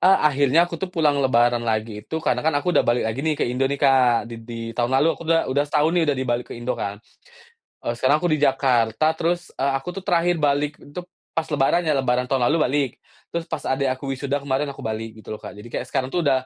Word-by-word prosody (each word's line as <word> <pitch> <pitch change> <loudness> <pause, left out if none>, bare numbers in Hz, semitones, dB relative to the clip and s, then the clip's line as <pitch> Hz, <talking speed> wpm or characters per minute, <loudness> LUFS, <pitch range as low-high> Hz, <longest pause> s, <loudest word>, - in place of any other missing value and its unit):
Eee, 190 +1 +6
akhirnya 140 +4 +3
aku 170 -2 -7
tuh 190 - -2
pulang 155 -5 +1
lebaran 120 -2 +3
lagi 110 -2 -2
itu 160 - -6
karena - - +1
kan 160 -1 +1
aku 180 +5 0
udah - - +5
balik 120 0 +2
lagi 110 +4 -2
nih 155 0 0
ke - - 0
Indo 125 +2 0
nih, 140 - -1
Kak, 130 -4 +4
di 115 - -6
di 115 +1 -8
tahun 120 +1 -1
lalu. 150 +4 +4
Aku - - -10
bilang, 165 0 +3
udah 145 +1 +2
setahun 150 +1 +2
nih 175 -2 +2
udah 145 - +2
dibalik 125 -2 -1
ke - - -5
Indo 120 +2 -2
kan. 100 0 -4 0.9
Eee, 120 - -2
sekarang 130 +5 +3
aku 175 - +1
di 155 - +2
Jakarta, 130 -3 +2
terus, 175 +1 -1
eee, 135 +1 +1
aku 135 - -7
tuh 195 - -5
terakhir 175 -2 +2
balik 145 0 0
itu 145 +5 -8 0.3
pas 165 - 0
lebaran 150 +4 +2
ya, 155 -3 +1
lebaran 125 -1 0
tahun 130 -3 +2
lalu 165 - +2
balik. 140 -1 +1 0.4
Terus 170 0 -1
pas - - -1
adik 135 0 +1
aku 135 +1 -4
wisuda 140 +2 -2
kemarin 140 +1 -1
aku 140 - -10
balik, 110 0 -4
gitu 110 - -8
loh, 105 - -9
Kak. 105 - -9
Jadi 105 +3 -10
kayak - - -4
sekarang 130 - -1
tuh 175 - +1
udah 130 -3 +2
135 Hz, 250 wpm, -23 LUFS, 120-155 Hz, 0.9 s, Eee